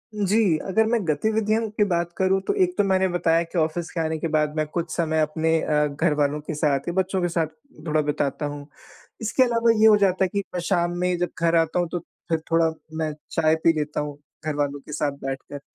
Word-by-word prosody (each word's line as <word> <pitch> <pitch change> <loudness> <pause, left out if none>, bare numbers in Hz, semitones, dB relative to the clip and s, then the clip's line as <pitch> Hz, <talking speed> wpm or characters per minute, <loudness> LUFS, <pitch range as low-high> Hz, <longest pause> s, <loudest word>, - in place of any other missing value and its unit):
जी। 205 -4 +2
अगर 220 +3 +2
मैं 235 0 +2
गतिविधियों 220 +7 +1
की 210 0 +1
बात 170 -2 -1
करूँ, 190 0 +2
तो 400 - -1
एक 360 0 -1
तो - - +4
मैंने 190 -1 +2
बताया 170 -2 +2
कि 170 +2 -7
ऑफ़िस 160 +2 -1
के 170 - -4
आने 160 0 -1
के 165 - -2
बाद 150 0 +1
मैं 155 - 0
कुछ 165 +2 -3
समय 160 -2 0
अपने 160 +1 +1
अ, 150 0 +2
घरवालों 145 0 0
के 155 - -5
साथ 145 -2 0
या 170 - -1
बच्चों 190 0 0
के 175 - +1
साथ 165 -2 0 0.4
थोड़ा 155 0 +2
बिताता 145 0 -1
हूँ। 145 0 -6 0.5
इसके 225 +4 +2
अलावा 230 -2 +3
ये 220 - +7
हो 215 - +8
जाता 190 -2 +2
है - - 0
कि 200 0 0
मैं 180 - -1
शाम 175 -2 +1
में 180 0 +1
जब 175 - 0
घर 170 0 +3
आता 165 +2 +2
हूँ 175 - 0
तो 175 - 0
फ़िर 165 0 -5
थोड़ा 165 0 +3 0.3
मैं 155 -1 -1 0.2
चाय 160 -1 +3
पी 165 - +6
लेता 150 0 -2
हूँ 145 -1 -5 0.3
घर 155 -1 -1
वालों 145 -1 -2
के 150 - -12
साथ 145 -1 -1
बैठकर। 135 +1 -5
165 Hz, 230 wpm, -24 LUFS, 150-190 Hz, 0.5 s, हो